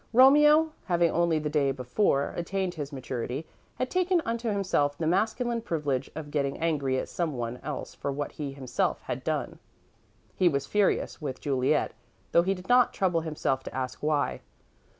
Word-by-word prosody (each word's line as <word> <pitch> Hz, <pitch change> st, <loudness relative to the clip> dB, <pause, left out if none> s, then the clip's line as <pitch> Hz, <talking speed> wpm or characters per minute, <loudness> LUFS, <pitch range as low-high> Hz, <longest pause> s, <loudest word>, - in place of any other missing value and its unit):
Romeo, 295 Hz, +5 st, +7 dB
having 170 Hz, -2 st, +2 dB
only 170 Hz, -1 st, +2 dB
the 155 Hz, 0 st, -2 dB
day 145 Hz, -3 st, +2 dB
before 135 Hz, -, 0 dB
attained 185 Hz, +1 st, -2 dB
his 145 Hz, -3 st, -5 dB
maturity, 130 Hz, +1 st, -4 dB, 0.3 s
had 255 Hz, -, -3 dB
taken 365 Hz, -1 st, +2 dB
unto 230 Hz, 0 st, -1 dB
himself 180 Hz, -8 st, +1 dB
the 165 Hz, -, -2 dB
masculine 225 Hz, +7 st, +1 dB
privilege 145 Hz, -, -2 dB
of 150 Hz, -2 st, -6 dB
getting 140 Hz, -2 st, -1 dB
angry 145 Hz, -5 st, 0 dB
at -, -, -2 dB
someone 125 Hz, -8 st, -3 dB
else 150 Hz, +1 st, -5 dB
for 140 Hz, -, -3 dB
what 145 Hz, +1 st, -3 dB
he 145 Hz, -2 st, -5 dB
himself 130 Hz, -3 st, -1 dB
had -, -, -4 dB
done. -, -, -2 dB, 0.8 s
He 180 Hz, -, +4 dB
was 140 Hz, -3 st, -1 dB
furious 205 Hz, -2 st, +1 dB
with 140 Hz, -4 st, -4 dB
Juliet, 135 Hz, +1 st, +1 dB, 0.4 s
though 170 Hz, -, +6 dB
he 190 Hz, +3 st, 0 dB
did 180 Hz, 0 st, -11 dB
not 245 Hz, -1 st, +4 dB
trouble 180 Hz, -4 st, +1 dB
himself 150 Hz, -4 st, -1 dB
to -, -, -7 dB
ask 130 Hz, -1 st, -4 dB
why. 150 Hz, -1 st, 0 dB
155 Hz, 170 wpm, -28 LUFS, 140-195 Hz, 0.8 s, Romeo